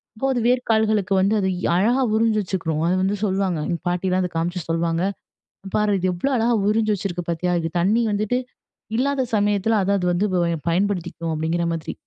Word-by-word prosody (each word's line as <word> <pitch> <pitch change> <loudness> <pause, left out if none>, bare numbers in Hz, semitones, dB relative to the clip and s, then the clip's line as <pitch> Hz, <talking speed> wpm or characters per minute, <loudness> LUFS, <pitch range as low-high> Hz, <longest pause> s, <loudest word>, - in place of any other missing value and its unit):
அப்போ 220 - -3
அது 245 - 0
வேர்க்கால்களுக்கு 220 -5 +2
வந்து 200 +3 +2
அது 190 -1 0 0.3
அழகா 230 +9 +2
உறிஞ்சி 220 -1 +2
வச்சுக்றும். 165 -5 -2
அது 180 - +2
வந்து 195 +2 +1
சொல்லுவாங்க, 190 -4 0
எங்க 170 -1 -1
பாட்டிலாம் 185 +1 0
இத 180 - -2
காமிச்சு 175 +2 -1
சொல்லுவாங்க. 165 +1 0 0.6
"இங்க 195 - -8
பாரு, 210 -2 +2
இது 185 +1 0
எவ்ளோ 180 +11 -1
அழகா 235 +1 +2
உறிஞ்சு 215 0 +2
வச்சிருக்கு 180 -3 -4
பாத்தியா? 170 +2 -1
இது 165 - -2
தண்ணி 210 +7 +2
வந்துட்டு 215 +4 0 0.6
இல்லாத 275 +1 +1
சமயத்ல 205 +1 +2
அத 195 - 0
அது 180 - -1
வந்து 180 +4 +1 0.4
பயன்படுத்திக்கும்" 175 -2 -1
அப்டிங்கற 165 +2 -1
மாதிரி. 160 -1 -4
190 Hz, 175 wpm, -22 LUFS, 175-215 Hz, 0.6 s, வேர்க்கால்களுக்கு